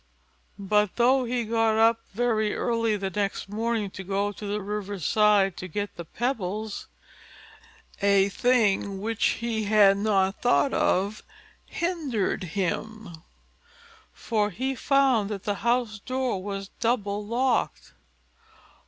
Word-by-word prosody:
But 210 0 +1
though 255 +2 +3
he 240 0 -1
got 225 0 +1
up 225 +1 +4
very 220 -1 0
early 230 -3 0
the 195 -1 -3
next 200 -1 -2
morning 215 -1 -2
to 190 - -8
go 200 +2 -1
to 205 +1 -8
the 205 +1 -2
river's 200 -3 -5
side 205 -3 +3
to 185 - -6
get 205 +3 -4
the 170 - -7
pebbles, 215 - -3 1.1
a 200 -1 +4
thing 205 -4 +1
which 225 +2 -3 0.2
he 220 -2 -1
had 205 -2 +5
not 200 -2 +1
thought 245 +3 +3
of 200 +3 +1 0.5
hindered 295 - -2
him; 200 +4 -3 1.0
for 210 -3 -1
he 260 +8 -2
found 265 -5 +2
that 205 -2 -5
the 205 - -1
house 235 -3 0
door 255 -3 -2
was 195 0 -5
double 210 -3 0
locked. 240 +4 -1
210 Hz, 125 wpm, -26 LUFS, 200-235 Hz, 1.1 s, had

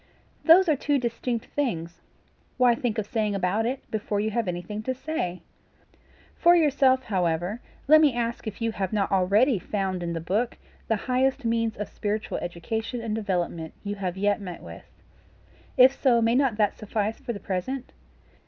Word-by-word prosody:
"Those 350 +3 +7
are 310 - +4
two 285 +1 +1
distinct 235 -1 -2
things. 170 - -2 0.6
Why 250 -2 +5
think 235 -1 -2
of 215 - -1
saying 210 -2 -1
about 195 +4 0
it, 260 +2 -3
before 210 -1 -2
you 215 +1 0
have 230 -1 -1
anything 180 +4 -4
to 260 +4 -3
say? 245 - -4 0.9
For 345 +1 +5
yourself, 275 -5 +3
however, 180 +1 -1 0.3
let 310 +2 +8
me 290 -6 +4
ask 235 -1 -2
if 220 +2 -5
you 230 - +1
have 195 -3 -3
not 200 -2 0
already 200 +5 +3
found 190 -2 -2
in 170 -1 -3
the 165 - -2
book 210 +9 -1 0.3
the 225 - +2
highest 260 +1 +1
means 230 -1 0
of 210 - -4
spiritual 210 0 -3
education 220 +8 -4
and 225 -2 -3
development 175 -6 -2
you 205 0 -3
have 190 -3 -4
yet 205 +1 +1
met 180 -3 -7
with? - - -10 0.9
If 255 +1 +8
so, 245 -4 +4
may 230 0 +2
not 255 -4 +2
that 210 -2 +2
suffice 215 0 -2
for 270 -3 -5
the 205 - -6
present? 240 +9 -4
220 Hz, 175 wpm, -26 LUFS, 195-250 Hz, 0.9 s, let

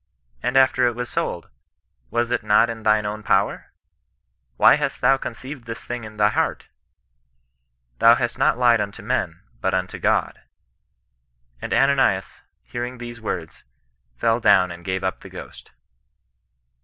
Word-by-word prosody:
and 125 - 0
after 130 -1 +4
it 120 - -1
was 125 0 -5
sold, - - -3 0.6
was 120 - -1
it 120 - 0
not 110 +2 +3
in 115 -1 -8
thine 110 -1 +2
own 105 +1 -4
power! 100 -1 0 0.9
Why - - +7
hast 150 -2 -3
thou 135 +1 +4
conceived 130 +1 -8
this 115 0 -8
thing 120 -2 -5
in 110 0 -11
thy 105 0 +4
heart? - - -1 1.3
Thou 115 +1 +7
hast 120 0 -3
not 135 -1 +3
lied 120 -3 +4
unto 100 -1 -6
men, - - -2 0.2
but 95 0 0
unto 95 0 -3
God. - - 0 1.2
And - - -6
Ananias, 135 -9 +2 0.2
hearing 120 +1 -6
these 120 -1 -9
words, 85 -7 -5 0.5
fell 115 - +1
down 90 -5 +4
and 85 0 -10
gave 95 +1 -3
up 95 - -2
the - - -12
ghost." - - -11
115 Hz, 150 wpm, -22 LUFS, 105-125 Hz, 1.3 s, Why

